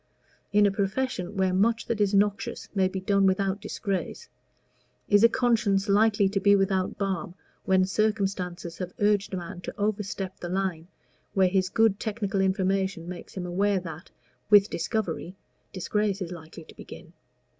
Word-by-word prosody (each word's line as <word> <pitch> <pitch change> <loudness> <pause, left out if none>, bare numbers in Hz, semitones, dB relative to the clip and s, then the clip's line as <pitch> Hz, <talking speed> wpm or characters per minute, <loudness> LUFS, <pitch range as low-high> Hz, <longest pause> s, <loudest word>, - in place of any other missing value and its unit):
In 205 0 +5
a 200 - +3
profession 200 -1 -2
where 190 -1 +2
much 225 +5 +2
that 225 -2 -2
is 200 -1 +3
noxious 205 +4 0
may 190 -2 +2
be 190 0 -4
done 195 +1 +2
without 195 +1 0
disgrace, 210 - -4 0.8
is 205 +1 +4
a 230 - +8
conscience 225 -5 +1
likely 210 0 +4
to 195 0 0
be 200 +1 +5
without 195 -1 0
balm 190 -3 -3 0.3
when 190 -1 +3
circumstances 195 -4 -2
have 180 0 -5
urged 205 -1 +2
a - - -2
man 180 +1 -7
to - - -7
overstep 200 -2 -3
the 175 - -5
line 180 -3 -2 0.5
where 190 -2 +4
his 185 0 +1
good 225 -1 +2
technical 205 -3 -2
information 190 -2 0
makes 180 -1 -9
him 180 - -3
aware 195 +2 +1
that 165 -2 -9 0.4
(with 205 0 +6
discovery) 185 -4 -3 0.4
disgrace 200 +1 -1
is 180 -3 -5
likely 165 -1 -10
to - - -15
begin? - - -12
195 Hz, 160 wpm, -27 LUFS, 185-205 Hz, 0.8 s, a